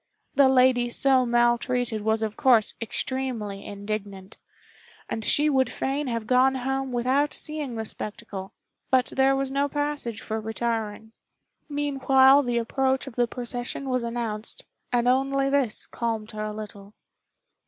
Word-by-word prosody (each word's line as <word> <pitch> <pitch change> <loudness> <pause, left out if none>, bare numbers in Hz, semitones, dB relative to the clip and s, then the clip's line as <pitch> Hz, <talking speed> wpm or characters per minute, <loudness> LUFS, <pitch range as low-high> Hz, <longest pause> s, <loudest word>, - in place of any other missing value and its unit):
The 275 -2 +5
lady 255 -2 +4
so 260 0 +3
maltreated 240 -1 +1
was 220 +1 +1
of 215 -1 -3
course 235 -5 +4
extremely 230 -4 -3
indignant, 200 -1 -6 0.7
and 225 - -4
she 295 +7 +3
would 265 -3 +2
fain 275 +2 -2
have 230 -3 -2
gone 255 +2 +4
home 270 +1 -2
without 260 +4 +1
seeing 300 -5 -3
the 220 0 -3
spectacle, 195 -3 -6 0.4
but 260 -1 +2
there 270 0 +4
was 270 0 -1
no 280 +1 +1
passage 290 -6 -2
for 220 0 -4
retiring. 220 -1 -3 0.6
Meanwhile 275 -1 +4
the 245 -3 -1
approach 265 +3 0
of 270 -4 -9
the 245 -1 +2
procession 245 +2 -4
was 255 -1 0
announced, 230 -2 -3 0.3
and 245 0 +2
only 270 +2 +2
this 270 -6 +1
calmed 225 -2 -3
her 215 -1 -4
a 215 - -3
little. 210 -1 -9
245 Hz, 145 wpm, -26 LUFS, 220-270 Hz, 0.7 s, The